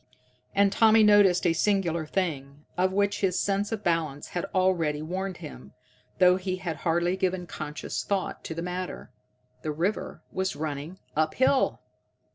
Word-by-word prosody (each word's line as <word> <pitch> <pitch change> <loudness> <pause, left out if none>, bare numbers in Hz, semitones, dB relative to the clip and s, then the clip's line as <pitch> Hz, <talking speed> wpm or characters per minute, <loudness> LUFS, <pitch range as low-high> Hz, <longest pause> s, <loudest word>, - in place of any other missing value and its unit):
And 200 0 +4
Tommy 220 +1 +5
noticed 205 -4 +5
a 170 - +4
singular 170 -3 +1
thing, 150 -6 -3
of 185 +1 +2
which 200 +1 0
his 185 -2 +1
sense 200 +1 0
of 220 -2 -3
balance 160 -4 -1
had 175 - -3
already 170 -5 +1
warned 185 +3 -4
him, 65 +2 -10 0.4
though 180 0 +6
he 185 0 -2
had 175 -4 -4
hardly 175 +1 +1
given 185 -1 -1
conscious 150 -3 -5
thought 195 -2 -2
to 160 - -5
the 165 - -4
matter. 180 +1 -5 0.5
_The 155 - -1
river 190 +6 -2
was 190 -2 -2
running 150 +3 -5 0.2
up 155 +1 +1
hill! 260 +1 +2
180 Hz, 155 wpm, -27 LUFS, 160-195 Hz, 0.5 s, though